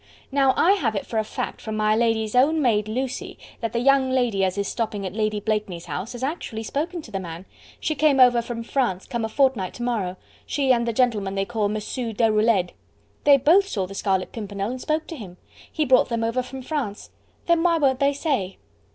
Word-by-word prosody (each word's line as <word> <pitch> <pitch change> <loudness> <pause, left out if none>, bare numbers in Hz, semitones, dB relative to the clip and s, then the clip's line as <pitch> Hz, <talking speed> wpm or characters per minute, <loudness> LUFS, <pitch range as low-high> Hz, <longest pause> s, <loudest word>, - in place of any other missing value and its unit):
Now 270 -1 +3
I 360 - +5
have 250 - +1
it 200 - -2
for 225 - -2
a - - +1
fact - - -5
from 220 -1 -4
my 215 0 +2
lady's 225 -2 +1
own 285 +6 +4
maid 215 -7 +2
Lucy, 255 +3 -4 0.2
that 230 - -2
the - - -2
young 265 +2 +3
lady 245 -7 +1
as 185 +1 0
is 200 -1 -1
stopping 215 -4 -3
at 185 - -4
Lady 215 -1 0
Blakeney's 205 -5 -2
house 190 +7 -5
has 245 +1 -7
actually 265 -6 -3
spoken 320 +8 -3
to - - -12
the 195 - -2
man. 170 0 -8 0.3
She 310 - -1
came 295 -2 +3
over 245 -2 +6
from 230 0 -5
France, 235 -7 -1
come 235 -2 -3
a 220 - -2
fortnight 250 -7 +1
to 240 - -5
morrow; 205 -7 -2 0.3
she 270 -3 +2
and 235 -1 0
the - - +1
gentleman 220 -5 +1
they 195 0 0
call 215 -2 -1
Mossoo 220 +3 -3
Deroulede. 215 -4 +2 0.5
They 285 -1 +8
both 350 +9 +4
saw 200 - -2
the 190 - -9
Scarlet 190 -1 -1
Pimpernel 205 -1 -4
and 255 0 -6
spoke 310 +1 -1
to 330 - -7
him. 190 - -10 0.3
He 310 - 0
brought 260 -1 +4
them 230 -1 -1
over 230 +3 0
from 260 +1 -8
France. 255 -8 -4 0.3
Then 340 -1 +3
why 340 -1 +3
won't 270 -4 +2
they 280 0 +3
say?" 270 - -2
235 Hz, 220 wpm, -24 LUFS, 210-270 Hz, 0.5 s, They